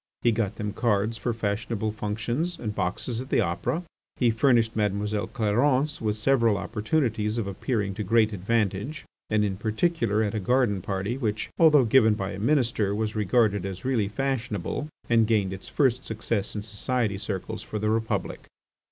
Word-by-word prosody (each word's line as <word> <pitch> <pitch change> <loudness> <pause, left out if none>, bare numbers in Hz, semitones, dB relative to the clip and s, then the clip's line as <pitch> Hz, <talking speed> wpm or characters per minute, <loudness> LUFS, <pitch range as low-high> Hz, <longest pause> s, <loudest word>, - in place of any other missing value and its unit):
He 120 - +5
got 110 -3 -1
them 105 -1 -4
cards 110 -1 0
for 120 +4 -1
fashionable 110 0 -2
functions 115 +11 -2
and 105 -3 -4
boxes 105 +5 -2
at 130 - -9
the - - +2
Opera. 95 - -1 0.3
He 120 -3 +3
furnished 115 -1 +3
Mademoiselle 105 0 0
Clarence 130 +6 +1
with 105 -2 0
several 115 -2 +3
opportunities 110 -2 -1
of 115 - -1
appearing 100 +1 -2
to 105 +2 -4
great 110 +1 +3
advantage 105 +7 -1 0.2
and 105 -1 +2
in 95 -2 -2
particular 110 - +1
at 105 - -1
a 110 - -1
garden 115 -2 +2
party 100 +7 -3
which, 110 -4 -2
although 150 -5 +6
given 110 -2 +5
by 100 -1 -3
a 100 - -6
Minister, 115 -5 +1
was 110 0 -2
regarded 105 -1 +2
as 95 +1 -6
really 120 -6 +1
fashionable, 125 - -2 0.2
and 115 -2 +4
gained 105 -4 +1
its 95 - -8
first 130 -3 +2
success 110 -2 -3
in 105 - -3
society 110 -1 -1
circles 100 +2 -4
for 110 - -5
the 105 +1 0
Republic. 110 0 -2
110 Hz, 170 wpm, -26 LUFS, 105-120 Hz, 0.3 s, although